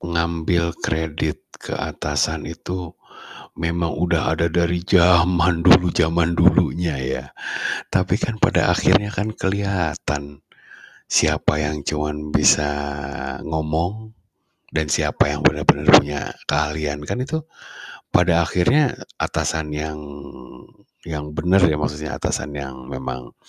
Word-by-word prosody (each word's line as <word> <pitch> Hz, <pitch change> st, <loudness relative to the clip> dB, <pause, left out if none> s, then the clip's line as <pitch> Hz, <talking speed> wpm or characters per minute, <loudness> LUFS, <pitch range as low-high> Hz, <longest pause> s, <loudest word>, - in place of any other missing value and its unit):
ngambil 85 Hz, 0 st, -1 dB
kredit 80 Hz, -1 st, -2 dB, 0.2 s
ke -, -, -5 dB
atasan 80 Hz, -1 st, -2 dB
itu 90 Hz, 0 st, -7 dB, 0.6 s
memang 85 Hz, 0 st, -1 dB
udah 85 Hz, -2 st, +1 dB
ada 85 Hz, +1 st, +1 dB
dari 85 Hz, +1 st, 0 dB
zaman 90 Hz, -1 st, +4 dB
dulu 90 Hz, 0 st, +6 dB
zaman 85 Hz, 0 st, +2 dB
dulunya 85 Hz, -2 st, +2 dB
ya, 65 Hz, 0 st, -3 dB, 0.7 s
tapi -, -, +1 dB
kan 110 Hz, -1 st, -2 dB
pada -, -, +3 dB
akhirnya 105 Hz, 0 st, +3 dB
kan 105 Hz, +2 st, -3 dB
keliatan, 85 Hz, -7 st, -2 dB, 0.7 s
siapa 75 Hz, 0 st, +2 dB
yang 75 Hz, -1 st, -3 dB
cuman 75 Hz, 0 st, -3 dB
bisa 75 Hz, -1 st, +5 dB, 0.8 s
ngomong 80 Hz, +8 st, -2 dB, 0.6 s
dan 75 Hz, -3 st, -2 dB
siapa -, -, +2 dB
yang -, -, -3 dB
bener-bener -, -, +3 dB
punya 70 Hz, 0 st, +6 dB, 0.3 s
keahlian 75 Hz, 0 st, -1 dB
kan 125 Hz, -, -2 dB
itu, 160 Hz, +2 st, -4 dB, 0.6 s
pada 85 Hz, -1 st, +3 dB
akhirnya 125 Hz, +10 st, +2 dB, 0.2 s
atasan 75 Hz, -2 st, -2 dB
yang, 75 Hz, 0 st, -4 dB, 1.0 s
yang 75 Hz, -2 st, -6 dB
bener 95 Hz, +4 st, +3 dB
ya 80 Hz, -, +1 dB
maksudnya 75 Hz, 0 st, -3 dB
atasan 75 Hz, -1 st, -3 dB
yang 65 Hz, -2 st, -7 dB
memang 65 Hz, -2 st, -7 dB
80 Hz, 110 wpm, -21 LUFS, 75-90 Hz, 1.0 s, dulu